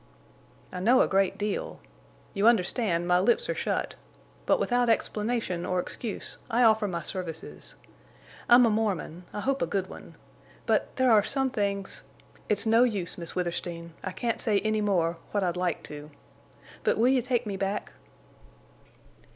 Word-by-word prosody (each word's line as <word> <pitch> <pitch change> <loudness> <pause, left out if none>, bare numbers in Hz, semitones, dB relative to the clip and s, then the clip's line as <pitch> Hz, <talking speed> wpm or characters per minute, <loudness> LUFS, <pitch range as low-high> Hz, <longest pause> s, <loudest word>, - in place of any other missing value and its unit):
"I 180 - -5
know 240 +8 +5
a - - +3
great 195 -1 +1
deal. 210 0 -3 0.5
You 200 +3 +2
understand, 190 -5 +2
my 180 0 +4
lips 220 +6 +2
are - - +1
shut. - - -2 0.5
But - - +3
without 245 -1 +1
explanation 215 -5 0
or 185 0 0
excuse 210 +4 -5
I 245 +1 +3
offer 220 -2 +4
my 170 -3 -4
services. 175 -4 -6 0.7
I'm 245 +1 +8
a 230 - +3
Mormon—I 205 -3 -2
hope 275 +3 0
a - - +1
good 190 +1 -2
one. - - -11 0.5
But—there 260 -2 +2
are 215 -2 +7
some 265 +4 0
things!... 200 -4 -2 0.5
It's 210 0 +2
no 225 +2 +5
use, 205 -8 -1
Miss 170 -2 -6
Withersteen, 170 -1 -4
I 185 - -3
can't 230 +4 -2
say 210 -3 +2
any 215 0 0
more—what 185 0 0
I'd 175 -1 0
like 180 -1 -1
to. 150 0 -9 0.7
But - - +2
will 235 +3 +4
you 260 -1 +3
take 245 -1 -1
me 205 -2 -3
back?" 195 +1 -3
205 Hz, 155 wpm, -27 LUFS, 180-230 Hz, 0.7 s, I'm